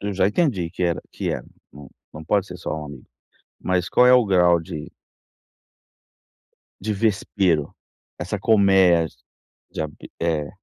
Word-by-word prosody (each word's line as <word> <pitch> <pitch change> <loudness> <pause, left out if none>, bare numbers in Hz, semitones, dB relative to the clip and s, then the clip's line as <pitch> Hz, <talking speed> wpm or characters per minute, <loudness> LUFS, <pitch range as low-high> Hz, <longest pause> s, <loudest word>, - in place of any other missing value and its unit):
eu 100 0 -3
já 95 0 +2
entendi 105 - 0
que 90 - -5
era 85 -1 0
que - - -3
é, - - -3 0.3
não 70 -1 -13 0.2
não 75 - -9
pode 100 +4 0
ser 90 - -9
só 80 - -4
um 75 - -7
amigo, 70 -4 -11 0.5
mas 90 -1 -1
qual 125 - +4
é 125 - +7
o 125 -3 +5
grau 90 -3 +4
de 75 -2 -8 1.9
de 105 +2 -2
vespeiro, 95 -6 0 0.4
essa - - -4
colmeia 95 -6 +4 0.6
de - - -6
abe 75 -1 -9
é. 80 -3 -1
90 Hz, 150 wpm, -22 LUFS, 80-100 Hz, 1.9 s, é